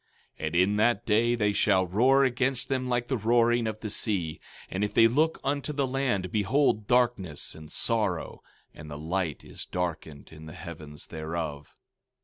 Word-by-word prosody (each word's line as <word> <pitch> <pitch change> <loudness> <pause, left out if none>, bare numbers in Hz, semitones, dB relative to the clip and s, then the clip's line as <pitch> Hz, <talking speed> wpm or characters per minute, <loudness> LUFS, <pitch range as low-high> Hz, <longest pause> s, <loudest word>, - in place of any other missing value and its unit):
15:30 - - -3
And 80 - -4
in 95 +4 +3
that 115 0 +2
day 115 +2 +3
they 105 -3 +1
shall 95 -2 +3
roar 125 +9 +4
against 130 0 0
them 130 -2 -1
like 120 -1 0
the 130 - 0
roaring 120 +1 +3
of 110 -1 -4
the 110 - -4
sea; 90 -8 -2 0.3
and 95 +2 -3
if 105 0 -2
they 115 - +7
look 155 +7 +1
unto 140 +2 -1
the 140 -2 0
land, 125 -9 -1
behold, 110 0 +1
darkness 120 - 0
and 80 -1 -12
sorrow, 105 -8 -1 0.3
and 75 0 -11
the 75 - -6
light 80 0 -2
is - - -7
darkened 85 -5 -4
in 80 0 -11
the 75 - -9
heavens 75 -4 -9
thereof. 80 -2 -5
105 Hz, 175 wpm, -28 LUFS, 85-120 Hz, 0.3 s, they